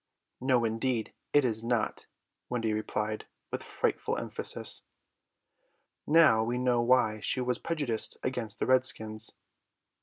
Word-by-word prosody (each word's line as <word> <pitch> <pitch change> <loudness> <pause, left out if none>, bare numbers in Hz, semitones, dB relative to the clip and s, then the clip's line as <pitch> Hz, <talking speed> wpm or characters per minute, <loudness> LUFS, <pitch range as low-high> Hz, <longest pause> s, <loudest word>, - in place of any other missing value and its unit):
"No, 125 -2 +2
indeed, 115 +1 -1 0.2
it 145 -2 +4
is 110 -2 -1
not," 120 -1 -1 0.4
Wendy 115 -3 -1
replied 110 0 -2 0.2
with - - -3
frightful - - -1
emphasis. - - -2 1.2
Now 150 -8 +6
we 120 +2 -1
know 125 -1 +2
why 120 -3 +3
she 130 - 0
was 125 0 -1
prejudiced 145 -9 -2
against 115 -4 -3
the - - -1
redskins. 120 -4 +2
120 Hz, 120 wpm, -30 LUFS, 110-130 Hz, 1.2 s, Now